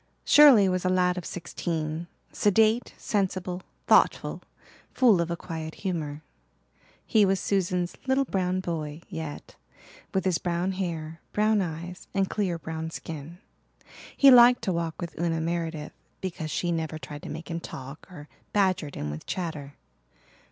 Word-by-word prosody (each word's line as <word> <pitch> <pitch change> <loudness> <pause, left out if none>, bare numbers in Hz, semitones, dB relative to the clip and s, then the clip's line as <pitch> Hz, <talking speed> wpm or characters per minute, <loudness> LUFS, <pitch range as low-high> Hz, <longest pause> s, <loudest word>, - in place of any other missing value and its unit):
Shirley 275 -10 +8
was 185 -1 0
a 185 - +1
lad 180 -1 +2
of 180 - -7
sixteen, 165 -2 -4 0.2
sedate, 220 +3 +2
sensible, 185 -3 -2 0.2
thoughtful, - - +3 0.5
full 225 -9 +5
of 170 - -2
a 170 - -1
quiet 160 -2 -6
humour. 155 -5 -3 0.8
He 220 -3 +4
was 195 -1 +2
Susan's 180 -2 0
"little 265 +1 +3
brown 185 -4 0
boy" 160 -2 -4
yet, 160 -5 -7 0.6
with 190 - -1
his 185 -3 +2
brown 175 +1 -1
hair, 165 -4 -4
brown 215 0 +3
eyes, 175 +1 -6
and 195 -1 +2
clear 185 -5 -1
brown 160 0 -5
skin. 160 0 -8 0.8
He 275 -1 +8
liked 245 -1 +8
to 190 -5 0
walk 170 -1 -3
with 170 -3 -6
Una 165 -1 0
Meredith 165 -2 -3 0.3
because 170 -4 -4
she 175 +3 -1
never 160 -2 -2
tried 145 0 -8
to - - -8
make 165 - -7
him 165 - -2
talk 135 -1 -9
or 150 -4 -10 0.3
badgered 185 -8 +1
him 75 0 -4
with 75 +1 -8
chatter. 155 -6 -4
175 Hz, 150 wpm, -27 LUFS, 160-190 Hz, 0.8 s, Shirley